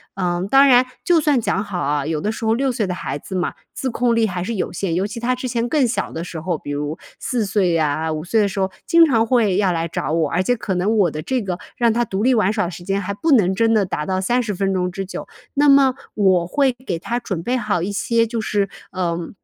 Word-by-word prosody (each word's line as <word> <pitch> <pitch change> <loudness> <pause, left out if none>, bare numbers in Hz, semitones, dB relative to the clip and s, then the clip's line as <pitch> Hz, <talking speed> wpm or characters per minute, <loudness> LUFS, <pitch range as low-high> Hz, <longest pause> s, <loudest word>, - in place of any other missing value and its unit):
嗯， 180 -1 -1
当 275 +1 +6
然， 250 -1 +6 0.2
就 350 -2 +4
算 290 -3 +3
讲 200 -2 0
好 200 -4 -5
啊， 145 -2 0
有 155 -1 -1
的 210 - -1
时 225 - -7
候 220 - +3
6 265 +3 +1
岁 225 -3 -1
的 180 - -2
孩 175 - -4
子 170 - -10
嘛， 180 -1 -1 0.2
自 265 - -3
控 240 0 +1
力 225 -1 +3
还 180 -2 -3
是 230 - -3
有 - - -2
限， 180 -2 -2
尤 190 +3 0
其 215 +2 -7
他 240 +2 0
之 255 +1 -4
前 235 -1 -1
更 280 -4 +2
小 235 - -2
的 165 - -5
时 170 - -6
候， 170 0 -1
比 145 - -10
如 145 +2 -3 0.2
4 240 -4 -1
岁 195 -3 +1
呀， 160 -1 0
5 155 0 -3
岁 220 +4 +2
的 205 - +2
时 195 - -4
候 190 0 +1 0.2
经 335 -1 +6
常 230 -6 +2
会 225 -6 +2
要 195 -2 +2
来 165 -1 -1
找 155 - -3
我， 160 -2 +1
而 180 +5 0
且 245 +5 +1
可 195 -3 -3
能 200 +5 +1
我 195 -5 +4
的 155 0 -5
这 260 -2 -1
个 185 -4 -3 0.2
让 235 -1 +3
他 240 - +1
独 195 0 -3
立 255 +2 +4
玩 210 -3 +2
耍 215 -3 0
的 175 - -4
时 175 0 -9
间 195 +2 -1
还 200 +1 -3
不 310 +10 -1
能 190 -7 +4
真 225 +2 +2
的 210 -3 +3
达 150 -4 -3
到 185 0 -1
30 230 +2 0
分 195 +1 0
钟 180 -1 -1
之 195 +1 -4
久。 190 - -7 0.3
那 290 +1 +4
么 275 -2 +5 0.2
我 185 -4 +3
会 275 +5 +2
给 170 -7 -2
他 235 +7 -2
准 190 -8 -4
备 245 +9 -1
好 210 -7 -1
一 185 - -2
些 230 +2 +1
就 230 0 -3
是， 205 -2 0 0.2
呃， 170 -2 -2
200 Hz, 280 characters per minute, -20 LUFS, 180-235 Hz, 0.3 s, 当